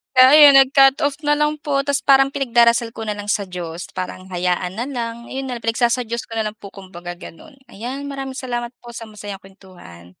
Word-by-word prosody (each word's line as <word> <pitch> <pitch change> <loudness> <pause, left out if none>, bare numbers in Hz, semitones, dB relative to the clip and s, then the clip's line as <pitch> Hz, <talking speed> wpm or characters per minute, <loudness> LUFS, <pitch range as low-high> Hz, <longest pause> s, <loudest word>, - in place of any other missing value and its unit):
Kaya 255 0 +8
ayun, 295 -2 +8
nag-cut-off 275 +1 +4
nalang 300 0 +1
po 275 -2 -1
tapos 280 -1 0
parang 270 0 +5
pinagdarasal 235 -3 +2
ko 225 - -6
na 210 - -2
lang 205 0 -8
sa 205 - 0
Diyos 175 -1 -7
parang 185 0 -6
hayaan 180 +1 -2
na 235 - -3
lang, 235 -3 -5
ayun 265 0 -5
nalang 245 -2 -6
pinagsasa-Diyos 235 0 0
ko 225 - -9
nalang 215 0 -3
po 200 - -12
kumbaga 180 -3 -10
ganun. 230 - -13 0.2
Ayan, 260 +7 -6
maraming 270 -1 -6
salamat 240 -2 -4
po 240 -1 -12
sa 230 - -7
masayang 205 -2 -9
kwentuhan. 185 - -15
235 Hz, 190 wpm, -20 LUFS, 195-270 Hz, 0.2 s, Kaya